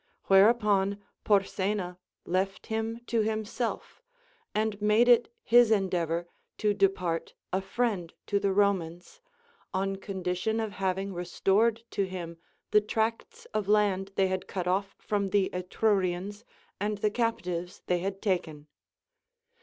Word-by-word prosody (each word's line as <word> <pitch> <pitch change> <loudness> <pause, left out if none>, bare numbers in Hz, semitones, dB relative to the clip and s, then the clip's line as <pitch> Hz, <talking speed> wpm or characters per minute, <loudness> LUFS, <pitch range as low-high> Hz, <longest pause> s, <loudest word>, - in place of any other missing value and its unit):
Whereupon 200 -1 +4 0.2
Porsena 195 -2 0 0.3
left 190 +2 -1
him 225 +1 -3
to 230 -2 +1
himself, 220 - -3 0.5
and 215 -1 0
made 210 +3 +4
it 240 -1 +5
his 240 0 +6
endeaA 185 -6 +1
or 170 +1 -2 0.3
to 210 -1 +2
depart 180 -4 0 0.2
a 190 - +1
friend 195 -5 -1
to 200 - +1
the 200 -1 +1
Romans, 190 - 0 0.5
on 195 +1 0
condition 190 +3 -2
of 220 -2 -2
having 195 0 -2
restored 195 +6 +1
to 200 -2 0
him 170 -3 -7 0.3
the 210 - +6
tracts 230 - -2
of 210 -2 -1
land 200 -2 +2
they 195 - +3
had 185 0 -2
cut 185 -2 -3
off 195 +2 0
from 200 -2 -1
the 195 -1 +2
Etrurians 190 +2 -1 0.3
and 205 +1 -1
the 210 +1 +1
captives 180 -7 -2
they 180 -1 +1
had 195 +2 -4
taken. 175 -7 -1
195 Hz, 130 wpm, -29 LUFS, 185-215 Hz, 0.5 s, his